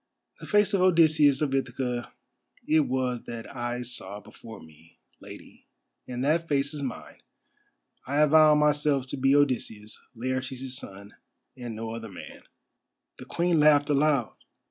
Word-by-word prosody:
"The -, -, -10 dB
face 210 Hz, -1 st, +3 dB
of 195 Hz, -, +2 dB
Odysseus 155 Hz, -5 st, +4 dB
of 140 Hz, -3 st, -1 dB
Ithaca 125 Hz, -2 st, -3 dB, 0.6 s
it 155 Hz, -, +4 dB
was 125 Hz, -2 st, -2 dB
that 115 Hz, +2 st, -8 dB
I 120 Hz, 0 st, -3 dB
saw 105 Hz, -5 st, -6 dB
before 110 Hz, +2 st, -13 dB
me, 80 Hz, +1 st, -19 dB, 0.2 s
Lady, -, -, -14 dB, 0.4 s
and 125 Hz, 0 st, -4 dB
that 165 Hz, +3 st, +1 dB
face 140 Hz, 0 st, 0 dB
is 150 Hz, -, -6 dB
mine. 130 Hz, -3 st, -7 dB, 0.9 s
I 145 Hz, +3 st, +1 dB
avow 155 Hz, 0 st, +6 dB
myself 150 Hz, -2 st, +2 dB
to -, -, -4 dB
be 135 Hz, +1 st, +3 dB
Odysseus, 120 Hz, -7 st, -1 dB, 0.2 s
Laertes' 130 Hz, +1 st, -4 dB
son, 100 Hz, -5 st, -8 dB, 0.4 s
and 120 Hz, -3 st, -7 dB
no 110 Hz, +1 st, -5 dB
other 115 Hz, -1 st, -7 dB
man." 95 Hz, -, -11 dB, 0.8 s
The -, -, -9 dB
Queen 170 Hz, -1 st, 0 dB
laughed 150 Hz, -1 st, +4 dB
aloud. 140 Hz, -4 st, +1 dB
130 Hz, 145 wpm, -26 LUFS, 120-150 Hz, 0.9 s, avow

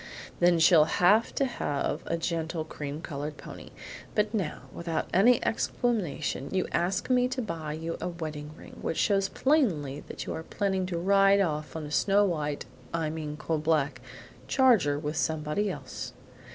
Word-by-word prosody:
"Then 175 Hz, 0 st, +5 dB
she 160 Hz, -, +6 dB
shall 160 Hz, -4 st, +7 dB
have 200 Hz, +7 st, +4 dB, 0.8 s
a 170 Hz, -, 0 dB
gentle 165 Hz, -1 st, -2 dB
cream 150 Hz, -1 st, -6 dB
colored 150 Hz, 0 st, -5 dB
pony; -, -, -10 dB, 0.5 s
but 210 Hz, 0 st, +1 dB
now, 200 Hz, -7 st, -2 dB
without 170 Hz, -1 st, -2 dB
any 225 Hz, +6 st, +5 dB
explanation, 180 Hz, -, -1 dB
you 185 Hz, -1 st, +1 dB
ask 180 Hz, +7 st, 0 dB
me 250 Hz, 0 st, +4 dB
to 260 Hz, +1 st, -4 dB
buy 165 Hz, -9 st, -4 dB
you 165 Hz, +2 st, -4 dB
a -, -, -2 dB
wedding 155 Hz, -3 st, -6 dB
ring, -, -, -13 dB
which 165 Hz, -, -2 dB
shows 195 Hz, -2 st, +2 dB
plainly 180 Hz, -, +1 dB
that -, -, -6 dB
you -, -, -3 dB
are -, -, -4 dB
planning 190 Hz, +1 st, -1 dB
to 175 Hz, -2 st, -3 dB
ride 195 Hz, +2 st, +4 dB
off 155 Hz, -6 st, -1 dB
on 160 Hz, -1 st, -4 dB
a 145 Hz, -, -8 dB
snow 200 Hz, +6 st, +3 dB
white 150 Hz, -5 st, -2 dB, 0.3 s
I 160 Hz, -2 st, -1 dB
mean 155 Hz, -2 st, -5 dB
coal 160 Hz, +1 st, -1 dB
black 150 Hz, -4 st, +1 dB, 0.5 s
charger 225 Hz, -, +4 dB
with 150 Hz, +1 st, -3 dB
somebody 160 Hz, +6 st, 0 dB
else." 185 Hz, -, -6 dB
165 Hz, 165 wpm, -28 LUFS, 150-195 Hz, 0.8 s, shall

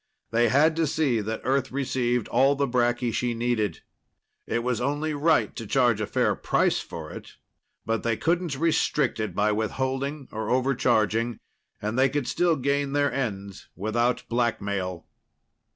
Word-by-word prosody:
They 120 Hz, 0 st, +3 dB
had 155 Hz, +6 st, +4 dB
to 165 Hz, -1 st, +2 dB
see 140 Hz, -6 st, +1 dB
that 110 Hz, +2 st, -4 dB
Earth 135 Hz, 0 st, 0 dB
received 125 Hz, -3 st, 0 dB
all 135 Hz, +4 st, +4 dB
the 140 Hz, 0 st, 0 dB
bracky 120 Hz, -1 st, +1 dB
she 120 Hz, 0 st, -1 dB
needed. 115 Hz, -6 st, -1 dB, 0.7 s
It 115 Hz, -, -1 dB
was 125 Hz, -2 st, -1 dB
only 145 Hz, +4 st, -1 dB
right 155 Hz, +2 st, +2 dB
to 115 Hz, -, -6 dB
charge 120 Hz, -3 st, +2 dB
a 105 Hz, -, -1 dB
fair -, -, +1 dB
price -, -, +1 dB
for -, -, -8 dB
it, -, -, -10 dB, 0.5 s
but 115 Hz, -1 st, 0 dB
they 115 Hz, -1 st, 0 dB
couldn't 170 Hz, -2 st, 0 dB
restrict 150 Hz, -4 st, +1 dB
it 105 Hz, -5 st, -3 dB
by 105 Hz, +1 st, +2 dB
withholding 130 Hz, +6 st, -2 dB
or 110 Hz, 0 st, -4 dB
overcharging. 120 Hz, -3 st, +1 dB, 0.4 s
And 110 Hz, +4 st, -2 dB
they 135 Hz, +1 st, +5 dB
could 140 Hz, -2 st, -2 dB
still 170 Hz, +6 st, +2 dB
gain 140 Hz, 0 st, 0 dB
their 145 Hz, 0 st, +1 dB
ends 100 Hz, -7 st, -4 dB
without 120 Hz, +6 st, 0 dB
blackmail. 100 Hz, -7 st, -1 dB
125 Hz, 155 wpm, -26 LUFS, 110-140 Hz, 0.7 s, they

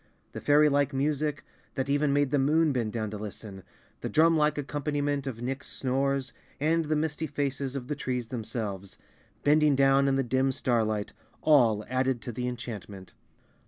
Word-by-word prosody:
The -, -, -7 dB
fairylike 145 Hz, -1 st, +4 dB
music, 145 Hz, +1 st, -1 dB, 0.3 s
that 130 Hz, 0 st, -1 dB
even 145 Hz, +1 st, +2 dB
made 145 Hz, -1 st, +2 dB
the 145 Hz, -, +2 dB
Moon 155 Hz, +2 st, +3 dB
bend 115 Hz, -4 st, -1 dB
down 110 Hz, -2 st, -3 dB
to 105 Hz, -, -6 dB
listen, 100 Hz, -1 st, -8 dB, 0.4 s
the -, -, -4 dB
drumlike 155 Hz, -1 st, +4 dB
ac¬ 145 Hz, -, -3 dB
companiment 145 Hz, -1 st, -2 dB
of 120 Hz, -3 st, -5 dB
Nick's 135 Hz, +2 st, -4 dB
snores 135 Hz, 0 st, -1 dB, 0.3 s
and 160 Hz, +3 st, +1 dB
the 155 Hz, +1 st, 0 dB
misty 155 Hz, +1 st, -1 dB
faces 140 Hz, -2 st, -2 dB
of 125 Hz, -3 st, -5 dB
the 150 Hz, -, -2 dB
trees 125 Hz, -4 st, -3 dB
themselves, 105 Hz, -5 st, -5 dB, 0.5 s
bending 150 Hz, 0 st, +4 dB
down 135 Hz, 0 st, +4 dB
in 135 Hz, -, +2 dB
the 135 Hz, -, +1 dB
dim 130 Hz, +2 st, +1 dB
starlight, 110 Hz, -5 st, -1 dB, 0.3 s
all 115 Hz, -9 st, +4 dB
added 130 Hz, 0 st, 0 dB
to 120 Hz, -, -4 dB
the 125 Hz, +2 st, -3 dB
enchantment. 105 Hz, -6 st, -7 dB
135 Hz, 165 wpm, -28 LUFS, 120-145 Hz, 0.5 s, fairylike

